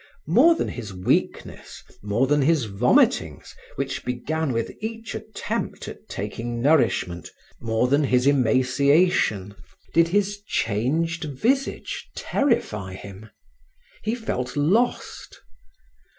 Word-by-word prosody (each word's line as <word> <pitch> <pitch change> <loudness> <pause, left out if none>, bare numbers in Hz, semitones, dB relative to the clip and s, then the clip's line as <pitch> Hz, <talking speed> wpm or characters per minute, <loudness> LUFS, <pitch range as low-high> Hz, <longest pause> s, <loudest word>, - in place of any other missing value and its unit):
More 255 - +5
than - - -2
his 105 -6 -7
weakness, 90 - -2 0.2
more 105 +5 +1
than 145 +2 +2
his 150 -2 +2
vomitings 110 +4 +1 0.2
which - - -3
began 140 +5 -2
with 115 -1 -2
each 225 0 -5
attempt - - -5
at - - -11
taking 115 +4 -4
nourishment, 115 - +1 0.3
more 115 +1 0
than 140 +3 +2
his 125 -1 +2
emaciation, 130 - +2 0.4
did 165 0 +5
his 205 +3 0
changed 160 - -1
visage 235 - -2
terrify 105 - -1
him. 100 +3 -11 0.7
He 220 +2 -1
felt 130 - -4
lost. 205 +12 0
135 Hz, 110 wpm, -24 LUFS, 115-170 Hz, 0.7 s, More